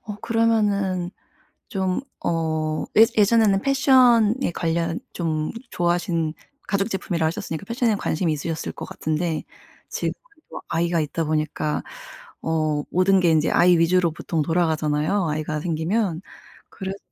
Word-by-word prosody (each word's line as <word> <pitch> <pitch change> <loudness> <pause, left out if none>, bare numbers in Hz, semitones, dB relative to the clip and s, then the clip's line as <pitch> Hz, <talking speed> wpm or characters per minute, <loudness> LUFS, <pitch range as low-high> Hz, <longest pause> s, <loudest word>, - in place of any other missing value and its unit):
어 210 -1 -6
그러면은 205 -6 +1 0.6
좀 190 0 -1 0.2
어 160 -2 -1
예 220 - +9
예전에는 210 -2 +4
패션에 260 -5 +4
관련 165 0 -1
좀 155 -3 -2 0.2
좋아하신 170 -2 0 0.3
가죽 200 +2 0
제품이라 175 -5 -1
하셨으니까 165 +2 -4
패션에 230 -1 +1
관심이 165 -3 -1
있으셨을 160 +2 -4
것 - - -8
같은데 160 +1 -2 0.5
지금은 - - -2 0.4
또 - - -7
아이가 170 +1 +1
있다 155 +2 -2
보니까 155 -1 -1 0.6
어 155 -2 0
모든 190 +2 +4
게 175 -2 +3
인제 155 0 +2
아이 175 0 +5
위주로 170 +1 +3
보통 160 0 -3
돌아가잖아요, 160 +2 +1
아이가 155 0 -2
생기면. 170 +2 -1 0.5
그래서 190 0 -6
170 Hz, 305 characters per minute, -23 LUFS, 160-200 Hz, 0.6 s, 예